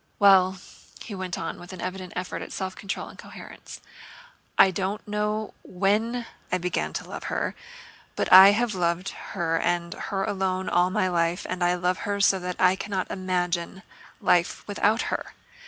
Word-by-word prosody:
"Well," 190 -2 +5 0.5
he 215 - -8
went 185 -2 -4
on 165 - -5
with 175 +2 -10
an 185 - -9
evident 185 0 -5
effort 180 0 -4
at - - -8
self 190 -1 -4
control 195 - -5
and - - -14
coherence. - - -11 0.8
"I 190 - +7
don't 195 +4 -3
know 210 +1 -2
when 215 +6 0 0.3
I 185 - +2
began 180 0 -2
to - - -5
love - - -7
her, - - -2 0.6
but - - +1
I 190 +1 +12
have 235 +1 0
loved 180 +1 0
her 165 -5 -2
and 175 0 -1
her 195 -1 -3
alone 190 -1 -1
all 175 +1 +3
my 185 -1 +1
life, 170 -1 0
and 180 -1 -2
I 175 0 +3
love 180 0 0
her 205 0 -2
so 195 -1 +4
that 180 0 -4
I 185 0 +5
cannot 190 -1 -3
imagine 180 0 -2 0.4
life 175 -3 +1
without 215 +3 +1
her. - - -5
185 Hz, 170 wpm, -26 LUFS, 180-200 Hz, 0.8 s, I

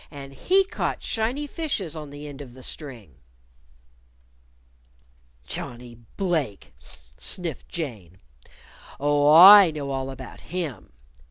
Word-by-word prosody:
And 140 -2 -11
he 380 - +2
caught - - -4
shiny 240 +6 -2
fishes 275 - -4
on 150 -2 -8
the 145 +1 -9
end 145 -1 -10
of 125 -3 -12
the 130 - -13
string." 115 - -9 2.3
"Johnnie 120 -1 -7 0.2
Blake!" 160 - -2 0.5
sniffed 160 - -1
Jane. 110 - -7 0.8
"Oh, 145 +1 +3
I 190 +3 +10
know 145 -3 -5
all 135 0 -3
about 135 -1 -10
him. 165 -7 -6
145 Hz, 110 wpm, -24 LUFS, 130-180 Hz, 2.3 s, I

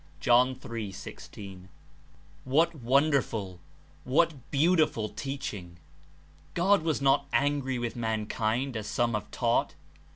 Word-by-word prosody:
'' - - -27
(John 125 +2 +4
3. 115 -5 -6
16.) 95 -1 -10 0.7
What 160 +6 +2
wonderful, 125 - +1 0.4
what 160 +6 +3 0.2
beautiful 150 -7 +2
teaching! 105 - -6 0.8
God 190 +2 +4
was 160 -3 -1
not 140 +1 +3
angry 140 -2 +1
with 120 -1 -3
mankind, 110 +2 -1
as 110 -1 -4
some 120 -1 0
have 105 -2 -3
taught. - - 0
125 Hz, 110 wpm, -29 LUFS, 110-145 Hz, 0.8 s, John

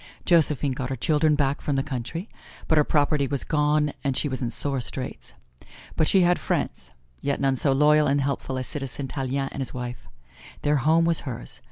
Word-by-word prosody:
Josephine 150 -5 +3
got 130 -1 -3
her 135 - -2
children 150 +3 +2
back 140 -1 0
from 145 - -1
the 135 - +1
country, 140 - -5 0.4
but 160 - +4
her - - +5
property 145 -1 +2
was 140 0 -2
gone 150 -1 +1
and 135 -2 0
she - - 0
was 130 -2 -4
in 120 - -1
sore 135 +2 -2
straits. - - -7 0.6
But 155 - +2
she 190 - +5
had 175 0 +3
friends, 65 - -2 0.3
yet 140 0 -1
none 135 -1 +2
so 135 +2 +2
loyal 150 +2 +4
and 140 +1 +2
helpful 135 -1 -2
as 130 - -3
Citizen 135 +1 -4
Tallien 135 0 -2
and 140 - -5
his 130 - -5
wife. 125 -1 -6 0.6
Their 145 0 +3
home 160 +4 +3
was 165 -1 +3
hers. 120 -3 -7
140 Hz, 200 wpm, -25 LUFS, 130-150 Hz, 0.6 s, her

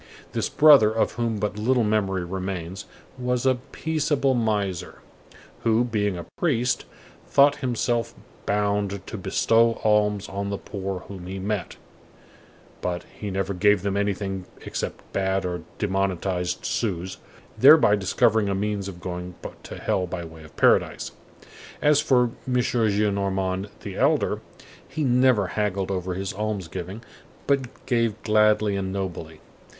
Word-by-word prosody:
This - - -1
brother, 145 -8 +7
of 110 0 +1
whom 115 -2 -1
but 105 0 -2
little 120 +2 +2
memory 100 -4 0
remains, 95 0 -5 0.3
was 125 0 -1
a 130 -1 +3
peaceable 150 -4 0
miser, 105 -6 -1 0.6
who, 115 +1 +3
being 105 -5 -1
a 85 - -6
priest, 125 -7 +1 0.4
thought 140 +1 +5
himself 120 -2 -1 0.3
bound 100 -1 0
to - - -7
bestow 115 +3 +3
alms 105 -1 +2
on 100 +1 -4
the 100 - -2
poor 95 -2 -5
whom 95 -2 -9
he 95 +1 -5
met, 100 -1 -3 1.1
but 90 -1 -2
he 105 - -6
never 95 0 -2
gave 100 0 +3
them 100 -1 -1
anything 100 -2 -2 0.2
except - - -4
bad 95 0 0
or 90 -1 -3 0.2
demonetized 95 -2 -1
sous, 95 -4 -2 0.4
thereby 140 -6 +7
discovering 105 +2 +2
a 100 - 0
means 100 0 -2
of 90 -3 -8
going 90 0 -5 0.3
to - - -9
hell 90 -1 0
by 85 -1 -5
way 80 -1 -12
of 80 - -16
paradise. - - +3 0.7
As 150 0 +4
for 125 -5 +3 0.2
M. 130 - -1
Gillenormand 100 -5 0
the - - -7
elder, - - +2 0.5
he 155 - -2
never 125 -6 +3
haggled 100 -2 -1
over 90 -1 -2
his 95 +1 -3
alms 105 -3 -3
giving, 95 +7 -7 0.4
but 135 -3 -1
gave 115 -4 +1
gladly 105 -1 +3
and 95 -1 -2
nobly. 85 -5 -5
100 Hz, 140 wpm, -25 LUFS, 95-115 Hz, 1.1 s, brother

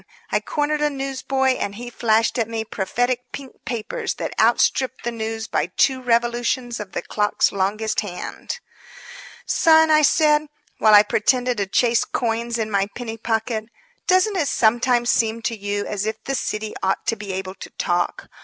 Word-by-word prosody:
I - - +3
cornered 300 0 -1
a 300 - +3
newsboy 270 -1 -1
and 200 0 -3
he 240 +2 -7
flashed 230 +1 +1
at 230 -1 0
me 225 -1 -3
prophetic 245 +5 -2
pink 270 -2 -10
papers 250 - -3
that - - -4
outstripped 260 -1 +2
the 240 - -1
news 225 -1 -4
by - - -1
two 260 +8 +1
revolutions 240 0 0
of 205 -3 -8
the - - -3
clock's 210 -1 +1
longest 210 +3 -1
hand. 205 - -5 0.9
"Son," 320 -1 +5
I 305 0 +6
said, 300 0 +3 0.3
while 215 -1 +6
I 205 - +9
pretended 245 +3 +1
to 200 -1 -1
chase 235 +3 +2
coins 235 0 -2
in 220 -1 -2
my 200 -1 +1
penny 230 -2 -5
pocket, 220 0 -1 0.4
"doesn't 375 +2 +3
it 310 -5 +1
sometimes 240 +1 +2
seem 225 0 0
to 230 - -1
you 205 -1 -3
as 210 0 -3
if 220 - -4
the 270 - -3
city 215 -4 -3
ought 190 0 0
to 230 - +1
be 205 -2 -7
able 190 0 -4
to - - -10
talk? 175 -1 -2
230 Hz, 175 wpm, -22 LUFS, 215-260 Hz, 0.9 s, I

